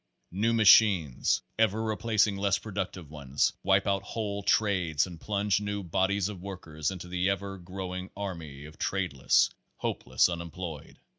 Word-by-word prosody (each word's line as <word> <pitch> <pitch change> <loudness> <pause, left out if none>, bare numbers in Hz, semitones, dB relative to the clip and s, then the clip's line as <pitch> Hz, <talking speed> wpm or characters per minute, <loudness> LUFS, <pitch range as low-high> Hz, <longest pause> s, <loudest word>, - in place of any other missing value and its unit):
New 105 +6 +1
machines, 100 - +5 0.2
ever 110 -2 +3
replac 110 -1 +2
ing 105 -2 -2
less 100 0 +1
productive 95 -6 -5
ones, 70 -2 0
wipe 95 0 +3
put 100 -1 0
whole 100 0 -4
trades 90 -8 +2
and 85 -3 -10
plunge 100 -1 0
new 100 -1 -3
bodies 95 +3 +1
of 100 -4 -7
workers 80 -6 -4
into 90 -2 -7
the 90 +1 0
ever 100 0 -3
growing 90 +1 -6
army 80 -8 -6
of 75 0 -13
tradeless, 90 -9 +2 0.2
hopeless - - +1
unemployed. 85 -2 -6
95 Hz, 145 wpm, -29 LUFS, 85-100 Hz, 0.2 s, machines